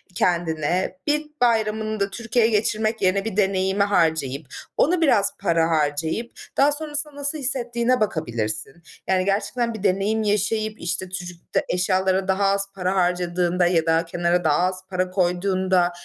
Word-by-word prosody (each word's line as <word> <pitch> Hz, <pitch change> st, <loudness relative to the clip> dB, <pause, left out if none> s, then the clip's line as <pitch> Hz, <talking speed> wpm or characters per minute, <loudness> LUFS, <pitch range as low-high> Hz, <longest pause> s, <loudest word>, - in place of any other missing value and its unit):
kendine 175 Hz, +1 st, 0 dB
bir 300 Hz, +1 st, +1 dB, 0.2 s
bayramını 220 Hz, -2 st, +1 dB
da 200 Hz, +1 st, 0 dB
Türkiye'ye 235 Hz, +1 st, 0 dB
geçirmek 215 Hz, +1 st, 0 dB
yerine 195 Hz, +2 st, +1 dB
bir 215 Hz, -3 st, -4 dB
deneyime 190 Hz, 0 st, +2 dB
harcayıp, 160 Hz, -7 st, 0 dB, 0.3 s
onu 340 Hz, +3 st, +2 dB
biraz 230 Hz, -11 st, +3 dB
para 170 Hz, -4 st, +1 dB
harcayıp 160 Hz, +8 st, -1 dB, 0.3 s
daha 280 Hz, +2 st, +5 dB
sonrasında 300 Hz, 0 st, -2 dB
nasıl 285 Hz, +2 st, 0 dB
hissettiğine 250 Hz, -2 st, 0 dB
bakabilirsin. 120 Hz, -, -2 dB, 0.2 s
Yani, 185 Hz, -1 st, +1 dB
gerçekten 230 Hz, +4 st, -1 dB
bir 215 Hz, -3 st, -8 dB
deneyim 200 Hz, +3 st, +1 dB
yaşayıp, 215 Hz, +1 st, 0 dB
işte, 175 Hz, +2 st, -2 dB
türük 175 Hz, -2 st, -8 dB
de -, -, +2 dB
eşyalara 185 Hz, +1 st, +1 dB
daha 195 Hz, +1 st, +1 dB
az 195 Hz, 0 st, +2 dB
para 185 Hz, 0 st, -1 dB
harcadığında 180 Hz, -1 st, +1 dB
ya 165 Hz, -2 st, +2 dB
da 165 Hz, +1 st, +2 dB
kenara 175 Hz, +1 st, 0 dB
daha 150 Hz, -2 st, +2 dB
az 185 Hz, 0 st, -3 dB
para 185 Hz, -1 st, -1 dB
koyduğunda 185 Hz, 0 st, +1 dB
190 Hz, 145 wpm, -23 LUFS, 175-220 Hz, 0.3 s, daha